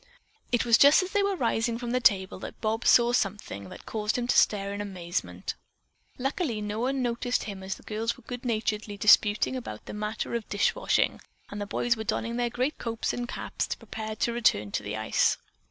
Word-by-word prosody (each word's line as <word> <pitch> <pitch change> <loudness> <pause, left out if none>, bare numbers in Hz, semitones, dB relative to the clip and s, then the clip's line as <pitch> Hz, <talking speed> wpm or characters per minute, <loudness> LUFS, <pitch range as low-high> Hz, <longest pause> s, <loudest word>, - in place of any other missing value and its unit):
It 240 -1 +2
was 235 -1 +5
just 285 +6 +7
as 370 - -6
they 410 - +2
were 400 0 +1
rising 230 -4 0
from 240 0 -4
the 250 - +2
table 190 -6 +3
that - - -8
Bob 225 +2 -1
saw 240 0 +6
something. 195 - -2
that - - -11
caused 210 0 -1
him 245 - -1
to - - +3
stare 200 -1 +3
in 205 - -4
amazement. 170 - -4 0.6
Luckily 270 - -1
no 210 +1 -3
one 260 +2 0
noticed 245 +1 0
him 200 -3 -6
as 190 0 -4
the - - -17
girls 225 +2 -2
were - - -17
good 245 0 -7
naturedly 215 -3 -2
disputing 210 +3 +5
about 235 - -6
the - - -7
matter 210 +2 -3
of 235 -2 -3
dish 205 - +2
washing, - - +1 0.3
and 205 0 -5
the 205 - -3
boys 240 +3 +1
were 220 - -5
donning 230 +2 -2
their 240 -1 +1
great 255 +5 -2
coats 230 -1 -2
and 245 0 -3
caps - - -3
preparing 220 0 -6
to 235 +2 0
return 105 - +2
to - - -1
the 105 +1 -4
ice. 110 0 +2
225 Hz, 210 wpm, -28 LUFS, 205-245 Hz, 0.6 s, just